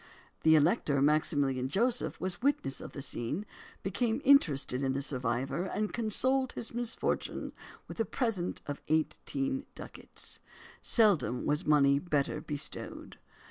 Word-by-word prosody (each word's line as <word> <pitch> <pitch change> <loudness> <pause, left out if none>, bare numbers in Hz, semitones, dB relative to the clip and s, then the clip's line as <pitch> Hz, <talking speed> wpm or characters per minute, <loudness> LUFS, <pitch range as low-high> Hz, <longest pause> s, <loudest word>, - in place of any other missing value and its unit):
The 160 0 +6
Elector 150 - +3
Maximilian 140 -3 +2
Joseph 235 - 0
was 185 +2 -4
witness 245 - 0
of - - -9
the 140 - -5
scene, 145 - -3 0.4
became 220 +5 0
interested 150 - +4
in 135 -1 +1
the 135 - -1
survivor, 130 +5 -1
and 210 +2 -2
consoled 255 +4 +2
his 230 - -4
misfortune 240 0 -2 0.3
with - - -9
a 225 - +2
present 215 -9 -2
of 145 -1 -5
eighteen 270 - -1
ducats. - - -7 0.4
Seldom 175 - +3
was 150 +4 0
money 140 -2 +5
better 145 -4 -1
bestowed. 145 0 -6
160 Hz, 130 wpm, -31 LUFS, 140-230 Hz, 0.4 s, The